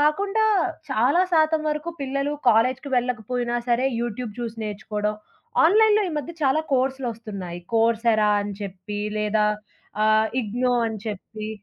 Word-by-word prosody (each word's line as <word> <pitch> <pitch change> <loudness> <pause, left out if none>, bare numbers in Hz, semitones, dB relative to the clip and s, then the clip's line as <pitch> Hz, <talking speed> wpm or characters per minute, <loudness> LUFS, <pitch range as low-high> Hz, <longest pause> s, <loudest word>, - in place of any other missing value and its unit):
కాకుండా 395 +9 +2 0.5
చాలా 260 +8 +3
శాతం 315 0 +3
వరకు 300 +3 -3
పిల్లలు 275 +2 -1 0.2
కాలేజీ‌కి 255 +5 +2
వెళ్ళకపోయినా 245 0 -1
సరే 240 +2 +2
యూట్యూబ్ 235 -1 -4
చూసి 230 -1 -4
నేర్చుకోవడం, 210 0 -3 0.5
ఆన్‌లైన్‌లో 425 +3 +5
ఈ - - -6
మధ్య 295 +4 -6
చాలా 285 +4 +3
కోర్సులొస్తున్నాయి. 225 -9 -3
'కోర్స్ 225 +1 +2
ఎరా' 210 -1 +3
అని 205 0 -5
చెప్పి 195 +1 -6 0.2
లేదా 210 0 +2 0.6
ఆహ్, 215 0 +4
'ఇగ్నో' 245 +3 0
అని 220 -1 -5
చెప్పి 215 +1 -6
240 Hz, 130 wpm, -24 LUFS, 215-275 Hz, 0.6 s, ఆన్‌లైన్‌లో